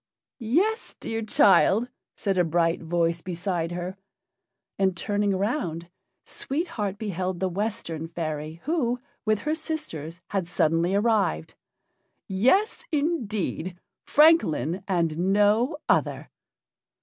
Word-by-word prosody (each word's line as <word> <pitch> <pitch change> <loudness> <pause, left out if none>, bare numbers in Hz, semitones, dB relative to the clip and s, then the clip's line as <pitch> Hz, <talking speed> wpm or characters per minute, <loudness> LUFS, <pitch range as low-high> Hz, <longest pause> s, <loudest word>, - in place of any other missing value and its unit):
"Yes, 360 - 0
dear 225 0 -3
child," 215 +1 +4 0.3
said 195 -2 -1
a - - +5
bright 165 +1 +1
voice 170 0 0
beside 175 -1 -2
her; 180 +2 -5 0.8
and, 190 -2 +2
turning 205 +1 0
round, 185 - -2 0.3
Sweet 325 +6 -3
Heart 205 - -3
beheld 185 -4 -3
the 190 - +1
Western 185 -4 -3
fairy, 155 -1 -5
who, 250 -7 0 0.3
with 215 -1 +1
her 300 - 0
sisters, 300 - -4
had 190 -4 -1
suddenly 170 +2 +1
arrived. 205 - +1 0.7
"Yes, 260 - +2
indeed! 220 - -1 0.3
Francolin, 240 - +4
and 170 -4 0
no 210 - +3
other!" - - +1
195 Hz, 110 wpm, -26 LUFS, 170-230 Hz, 0.8 s, a